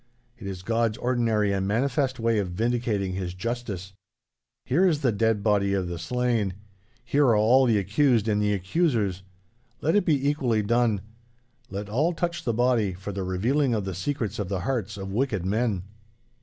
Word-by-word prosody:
It 100 - -7
is 95 -2 -6
God's 115 +1 0
ordinary 115 -5 +1
and 95 0 -1
manifest 130 +4 0
way 115 -1 +2
of 95 -3 -2
vindicating 110 -1 -1
His 90 -1 -4
justice. 100 -3 -4 0.7
Here 175 +9 +3
is 155 -4 +1
the 130 -4 +2
dead 110 -1 +1
body 100 -2 +2
of 95 -2 -1
the 85 -1 -5
slain. 115 0 0 0.5
Here 145 +1 +2
are 115 - +5
all 120 +5 +5
the 115 -3 +3
accused 110 +3 +2
and 105 -1 +1
the 105 0 +1
accusers. 100 - 0 0.6
Let 160 +5 +1
it 205 - +4
be 140 -3 +2
equally 125 -7 +1
done. 115 -2 +2 0.7
Let 100 +1 -5
all 145 +11 +1
touch 170 -2 -3
the 120 - +1
body, 120 -5 +2
for 95 +3 -6
the 100 0 -4
revealing 115 +9 +1
of 105 -3 -2
the 95 - -3
secrets 115 - -3
of 100 -3 -3
the 95 -3 -2
hearts 105 -2 -2
of 95 0 -6
wicked 110 -6 0
men. 105 -2 0
110 Hz, 180 wpm, -26 LUFS, 100-125 Hz, 0.7 s, are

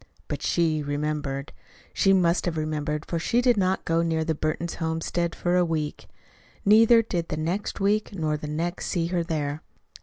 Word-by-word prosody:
But - - -4
she 160 -3 +1
remembered. 145 -1 -3 0.4
She 195 - +3
must 180 -2 +3
have 170 -3 -1
remembered, 150 0 -2
for 170 - -2
she 230 +8 +1
did 245 -1 +4
not 190 -2 0
go 165 0 +2
near 165 -1 0
the 160 - +1
Burton 155 +2 -2
homestead 165 +1 -2
for 175 0 0
a 180 - +4
week. 155 -3 -3 0.6
Neither 225 +3 +6
did 170 -6 -2
the 155 - -2
next 170 +6 -2
week 205 +2 +1
nor 155 -6 -1
the 150 0 -6
next 170 +4 -3
see 170 -3 0
her 175 -1 +1
there. 150 -3 -2
165 Hz, 180 wpm, -26 LUFS, 155-180 Hz, 0.6 s, Neither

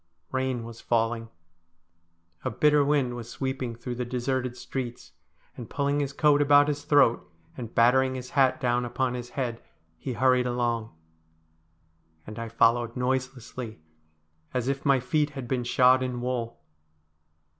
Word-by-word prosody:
Bain 130 -2 -1
was 115 0 -10
falling. 115 0 0 1.1
A - - 0
bitter 150 -1 +3
wind 140 -4 +1
was 120 -1 -7
sweeping 130 -3 -3
through 120 +2 -6
the 125 +1 -3
deserted 125 0 -2
streets, 125 -2 -6 0.4
and 120 -3 -9
pulling 140 0 0
his 140 -1 -1
coat 145 0 +3
about 145 0 +5
his 145 -1 -3
throat, 125 - +3 0.2
and 115 -3 -8
battering 130 +3 +4
his 125 0 -7
hat 135 -3 +3
down 120 -1 +1
upon 125 +1 -1
his 125 -1 -6
head, 120 -4 -3 0.4
he 130 - -4
hurried 125 0 +3
along. 120 -4 -1 1.3
And 105 +1 -8
I 115 0 -5
followed 115 +1 +2
noiselessly, 125 -2 -3 0.8
as 125 -1 0
if 140 +1 -2
my 135 -1 +5
feet 150 +4 0
had 130 -3 -5
been 125 0 -1
shod 130 +1 +4
in 125 -1 -2
wool. 120 -2 -3
125 Hz, 145 wpm, -27 LUFS, 120-135 Hz, 1.3 s, about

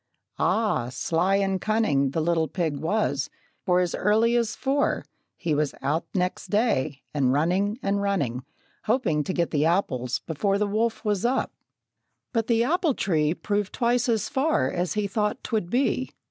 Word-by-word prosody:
Ah, 210 - +1
sly 170 +8 +1
and 195 -2 0
cunning 195 -11 +2
The 160 +4 -1
little 165 0 +1
pig 160 -1 -2
was, 160 -5 0 0.4
for 180 0 +4
as 175 -1 -1
early 220 +4 +2
as 235 -2 +1
four 280 +1 0 0.3
He 160 - -1
was 150 -1 0
out 155 +4 -1
next 180 -1 -1
day, 155 - 0
and 135 -4 +2
running, 180 - +1
running, 195 -11 0 0.4
Hoping 210 - +1
to 185 - -3
get 170 -2 0
the 150 -1 +2
apples 130 -9 0
before 195 +5 -1
The 210 - +1
wolf 220 +3 -1
was 205 -2 0
up. 250 +3 +1 0.8
But 225 -2 0
the 230 -1 +3
apple 320 +1 +1
tree 155 -3 +1
Proved 205 0 -2
twice 245 0 +1
as 220 -3 +1
far 270 - +1
as 175 0 -1
he 210 -1 0
thought 210 +1 -1
'twould 215 -6 -2
be. 260 +2 +1
195 Hz, 160 wpm, -25 LUFS, 160-220 Hz, 0.8 s, for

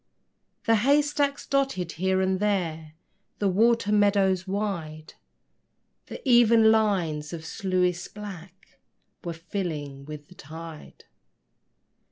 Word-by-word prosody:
The 225 0 +4
hay 280 +7 +4
stacks 285 -1 -1
dotted 270 -11 0
here 190 +2 0
and 190 0 0
there 165 -7 -1 0.4
The 205 - 0
water 225 +2 +2
meadows 200 -3 +2
wide: 170 -6 -4 0.9
The - - -9
even 230 -2 +6
lines 175 -9 0
of 160 -1 -7
sluices 180 0 -1
black 195 -3 -11 0.4
Were 170 - -4
filling 160 -6 -5
with 150 -1 -9
the - - -16
tide. 160 0 -11
190 Hz, 110 wpm, -26 LUFS, 165-210 Hz, 0.9 s, even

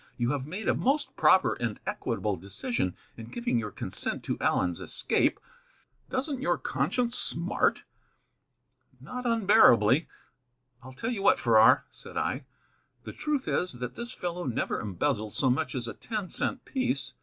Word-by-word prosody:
"You 120 +1 +1
have 140 -2 -3
made 185 +7 -5
a - - +4
most 285 +3 0
proper 190 - +5
and 115 -3 -2
equitable 105 -2 -2
decision 100 - -3 0.2
in 115 -1 -8
giving 240 - -1
your 105 -2 -4
consent - - -3
to - - -2
Allen's 90 -2 +1
escape. - - +1 0.7
Doesn't 265 0 -2
your 175 - +1
conscience 235 - -1
smart?" - - 0 1.2
"Not 250 0 -5
unbearably. 180 - +5 0.7
I'll 130 +1 -11
tell 225 - -3
you 220 -5 -3
what, 200 - +4
Farrar," 110 -2 +5
said - - -10
I, 135 +1 -1 0.6
"the - - -8
truth 295 -3 -2
is, 180 - 0
that 125 0 -5
this 235 +1 -6
fellow 175 -5 -4
never 125 -7 -1
embezzled 105 +2 -2
so 130 -3 +3
much 140 0 -1
as 120 -3 -3
a - - -5
ten 215 -5 -5
cent 260 - -1
piece. 140 - -1
145 Hz, 155 wpm, -28 LUFS, -, 1.2 s, proper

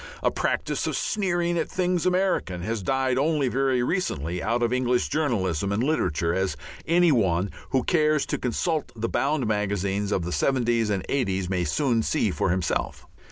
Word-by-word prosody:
A - - +3
practice - - -1
of - - -1
sneering 175 -4 0
at 160 - -2
things 180 -2 0
American 180 - 0
has 110 +1 -2
died 130 +4 0
only 145 -2 +1
very 130 -1 +1
recently 90 - -2
out 115 +4 0
of 120 +1 +1
English 125 -1 +1
journalism 100 - 0
and 105 +4 0
literature, 85 - 0
as 95 -5 -1 0.3
any 175 0 +4
one 95 - +1 0.2
who 130 -2 +1
cares 155 -3 +2
to - - -3
consult 155 +5 -1
the 115 0 -2
bound 140 +1 0
magazines 100 -1 -1
of 95 - 0
the 90 - -3
'seventies 120 -2 +1
and 100 -3 -1
'eighties 95 -9 -1
may 90 -2 0
soon 125 - +1
see 110 -2 0
for 90 - 0
himself. 90 -2 -1
120 Hz, 170 wpm, -25 LUFS, 95-150 Hz, 0.3 s, any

